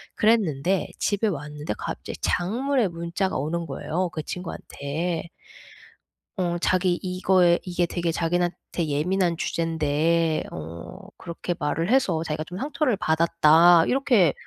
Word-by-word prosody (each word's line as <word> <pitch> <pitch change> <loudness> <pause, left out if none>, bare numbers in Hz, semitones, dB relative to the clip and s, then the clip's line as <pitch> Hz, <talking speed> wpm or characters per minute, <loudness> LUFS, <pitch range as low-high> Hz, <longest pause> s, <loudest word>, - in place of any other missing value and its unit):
그랬는데 190 -5 +2
집에 205 +2 +1
왔는데 150 - -4
갑자기 - - -6
장문의 235 +4 +1
문자가 170 +2 -2
오는 165 +5 -2
거예요 170 +5 -2
그 155 - -5
친구한테. 165 -1 -4 1.1
어 175 -2 0
자기 185 0 +2
이거에 180 -1 +3
"이게 175 -1 0
되게 170 -1 -2
자기네한테 175 +1 0 0.2
되게 165 -4 -2
예민한 180 +1 +1
주제인데 160 0 0
어 85 - -8 0.2
그렇게 175 0 -4
말을 165 +5 -1
해서 185 -12 +2
자기가 155 -1 -3
좀 180 +2 -8
상처를 285 -3 0
받았다." 165 0 +5
이렇게 240 - +3
170 Hz, 305 characters per minute, -25 LUFS, 160-185 Hz, 1.1 s, 받았다